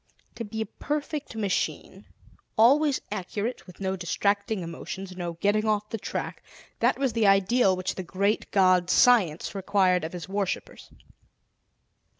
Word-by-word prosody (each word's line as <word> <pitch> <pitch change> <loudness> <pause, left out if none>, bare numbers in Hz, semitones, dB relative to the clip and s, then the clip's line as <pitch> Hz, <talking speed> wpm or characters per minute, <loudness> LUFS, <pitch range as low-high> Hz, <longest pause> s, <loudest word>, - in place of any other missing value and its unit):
To 230 - -6
be 220 +1 -5
a - - -1
perfect 295 -1 -4
machine, 205 -3 -2 0.5
always 275 +5 +4
accurate, 210 +4 -4
with 180 - -14
no 190 -1 -1
distracting 200 +4 -1
emotions, 185 +3 -7
no 175 -2 -4
getting 205 +5 +1
off 210 -1 0
the 225 - -3
track - - -5 0.4
that - - +2
was 265 -3 0
the 220 -2 +2
ideal 195 +1 +4
which 185 +1 -3
the - - -5
Great 200 +4 -1
God 185 -2 +3
Science 195 -12 +4
required 190 -2 +2
of 160 - -5
his 175 -2 -6
worshippers. 195 -1 -4
200 Hz, 145 wpm, -26 LUFS, 185-220 Hz, 0.5 s, always